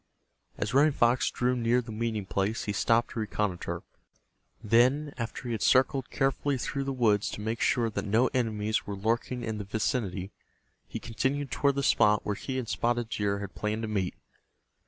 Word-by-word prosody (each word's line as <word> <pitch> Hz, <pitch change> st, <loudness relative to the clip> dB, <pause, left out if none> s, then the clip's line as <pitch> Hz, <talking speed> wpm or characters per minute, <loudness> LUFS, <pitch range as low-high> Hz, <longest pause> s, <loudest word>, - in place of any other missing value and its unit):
As 105 Hz, +2 st, -2 dB
Running 145 Hz, +2 st, +5 dB
Fox 120 Hz, 0 st, +3 dB
drew 125 Hz, +1 st, 0 dB
near 120 Hz, 0 st, +2 dB
the 115 Hz, -2 st, -6 dB
meeting 110 Hz, -2 st, -2 dB
place 100 Hz, +3 st, -1 dB
he 105 Hz, -, -2 dB
stopped 115 Hz, +3 st, +2 dB
to -, -, -4 dB
reconnoiter. 105 Hz, -4 st, -2 dB, 0.8 s
Then, 130 Hz, +7 st, +3 dB
after 115 Hz, 0 st, -5 dB
he 120 Hz, -, -4 dB
had 110 Hz, -3 st, -2 dB
circled 130 Hz, 0 st, +3 dB
carefully 135 Hz, 0 st, 0 dB
through 135 Hz, +2 st, -3 dB
the 135 Hz, -, -1 dB
woods 110 Hz, -6 st, +2 dB
to -, -, -6 dB
make 110 Hz, +2 st, -3 dB
sure 120 Hz, -2 st, +2 dB
that 110 Hz, -, -3 dB
no 110 Hz, +5 st, +3 dB
enemies 110 Hz, -4 st, 0 dB
were 100 Hz, -, -3 dB
lurking 115 Hz, +4 st, -1 dB
in 110 Hz, -1 st, -3 dB
the -, -, -3 dB
vicinity, 100 Hz, -2 st, -2 dB, 0.6 s
he -, -, -5 dB
continued 135 Hz, +5 st, -2 dB
toward 140 Hz, -1 st, +2 dB
the 140 Hz, -, -1 dB
spot 105 Hz, -5 st, +4 dB
where 105 Hz, -, 0 dB
he 130 Hz, +6 st, -4 dB
and 125 Hz, -3 st, -3 dB
Spotted 120 Hz, 0 st, 0 dB
Deer 100 Hz, -2 st, -1 dB
had 100 Hz, -1 st, -6 dB
planned 105 Hz, +1 st, -2 dB
to -, -, -2 dB
meet. 100 Hz, -4 st, -1 dB
115 Hz, 185 wpm, -29 LUFS, 105-125 Hz, 0.8 s, Running